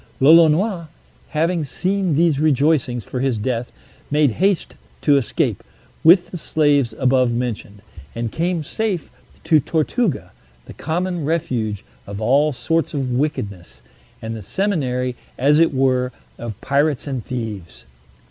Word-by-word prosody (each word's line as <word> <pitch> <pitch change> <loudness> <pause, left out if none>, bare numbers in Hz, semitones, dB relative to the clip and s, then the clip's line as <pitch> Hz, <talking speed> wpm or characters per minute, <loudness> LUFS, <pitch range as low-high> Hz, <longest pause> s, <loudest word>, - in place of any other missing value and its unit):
Lolonois, 165 +5 +4 0.4
having 165 +1 0
seen 185 +3 -1
these 160 -2 +2
rejoicings 140 -5 +2
for 125 - -5
his 130 -3 0
death, 120 +2 -2 0.4
made 150 -2 +3
haste 190 - 0 0.3
to 145 - +5
escape, 135 -5 0 0.4
with 175 +2 +6
the 180 - -5
slaves 145 -6 +2
above 130 -2 +2
mentioned, 110 -4 -4 0.3
and 115 -1 -3
came 170 -1 -1
safe 200 0 -3 0.3
to 155 - +4
Tortuga, 155 - -1 0.3
the - - -11
common 175 +1 -2
refuge 130 - -2 0.2
of 100 0 -6
all 140 +7 +3
sorts 165 +3 -1
of 135 -3 -2
wickedness, 100 - -3 0.4
and 115 0 -4
the 110 - -7
seminary, 125 - -1 0.2
as 145 +4 +4
it 165 - +4
were, 130 -2 +1 0.3
of 115 -4 -6
pirates 140 0 +1
and 135 -5 -4
thieves. 110 - -6
140 Hz, 130 wpm, -20 LUFS, 125-165 Hz, 0.4 s, with